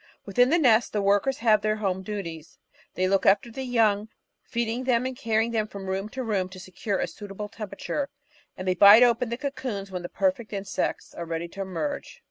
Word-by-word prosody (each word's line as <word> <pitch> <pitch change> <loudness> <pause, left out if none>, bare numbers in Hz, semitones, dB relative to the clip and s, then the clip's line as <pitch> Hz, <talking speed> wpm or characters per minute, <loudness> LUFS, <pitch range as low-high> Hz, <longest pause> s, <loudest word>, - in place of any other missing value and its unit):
Within 245 +6 +3
the 335 - +4
nest, 240 -7 +4
the 210 - +1
workers 205 +7 +2
have 215 -2 +3
their 215 0 +1
home 190 -3 -1
duties, 170 -6 -6 0.4
they 185 +2 +1
look 195 0 +2
after 200 +4 +4
the 265 - -6
young, 220 -4 +2 0.3
feeding 235 +1 -2
them 250 -1 +2
and 260 0 -3
carrying 225 -3 0
them 220 -2 0
from 200 -2 -8
room 190 +2 -3
to 260 +3 -5
room 200 -5 -1
to 185 0 -11
secure 190 +2 -3
a - - 0
suitable 205 0 -7
tem 215 -2 -7
perature, 275 +8 -3 0.5
and 185 - -6
they 185 - +3
bite 205 +6 +9
open 240 0 +3
the 235 - -3
cocoons 250 -8 -4
when 180 -1 -4
the 175 - -6
perfect 275 -7 -1
insects 195 -1 -3
are 170 - -6
ready 165 +1 -3
to 195 - -7
emerge. 280 - -4
210 Hz, 210 wpm, -26 LUFS, 195-235 Hz, 0.5 s, bite